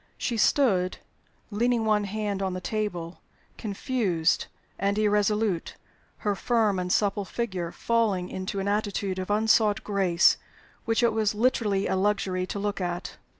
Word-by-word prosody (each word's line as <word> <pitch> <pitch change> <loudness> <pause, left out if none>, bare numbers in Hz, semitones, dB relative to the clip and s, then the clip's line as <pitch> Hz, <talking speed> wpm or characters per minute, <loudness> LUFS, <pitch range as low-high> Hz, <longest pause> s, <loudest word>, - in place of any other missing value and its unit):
She 240 - -2
stood, 205 -6 +2 0.5
leaning 230 +2 +1
one 210 -1 +2
hand 205 -1 -3
on 190 -1 -1
the - - -3
table, 180 -3 -4 0.3
confused 200 - 0 0.3
and 200 +1 0
irresolute, 210 -3 +1 0.5
her 205 - +2
firm 220 -2 +1
and 180 0 -2
supple 205 0 +1
figure 190 -5 -3
falling 215 -6 0
into 190 +2 -4
an 195 - -2
attitude 200 -2 -1
of 185 - -5
unsought 215 0 +3
grace 190 -4 +3 0.5
which 225 +1 +1
it 235 -2 +3
was 215 -1 +1
literally 210 -4 +1
a - - 0
luxury 190 -2 0
to - - -4
look 200 0 -2
at. 175 0 -4
205 Hz, 145 wpm, -27 LUFS, 185-215 Hz, 0.5 s, unsought